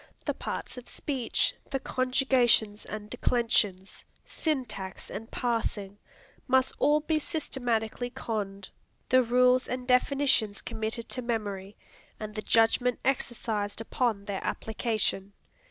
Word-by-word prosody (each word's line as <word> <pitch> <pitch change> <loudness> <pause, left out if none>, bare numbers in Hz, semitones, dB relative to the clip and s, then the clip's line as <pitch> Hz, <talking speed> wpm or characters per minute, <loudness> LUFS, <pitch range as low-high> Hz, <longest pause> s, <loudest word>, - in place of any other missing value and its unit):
The - - +1
parts - - -5
of 245 - -14
speech, 265 -5 0 0.2
the 270 - -1
conjugations 255 -5 +2
and 210 -1 -6
declensions, 220 -5 0 0.2
syntax 255 - -3
and 225 +3 -6
parsing, 220 -4 -2 0.5
must 260 0 +3
all 295 +2 +4
be 310 +1 +1
systematically 245 -6 -1
conned, 205 -6 -4 0.4
the 255 0 +6
rules 250 +1 +4
and 250 0 -4
definitions 250 -5 +3
committed 220 +1 -3
to 255 - -2
memory, 205 -4 -3 0.4
and 215 -1 -5
the 215 - -3
judgment 235 +3 +3
exercised 225 -6 -1
upon 225 -2 0
their 200 -1 -3
application. 215 -3 -1
235 Hz, 115 wpm, -29 LUFS, 210-255 Hz, 0.5 s, the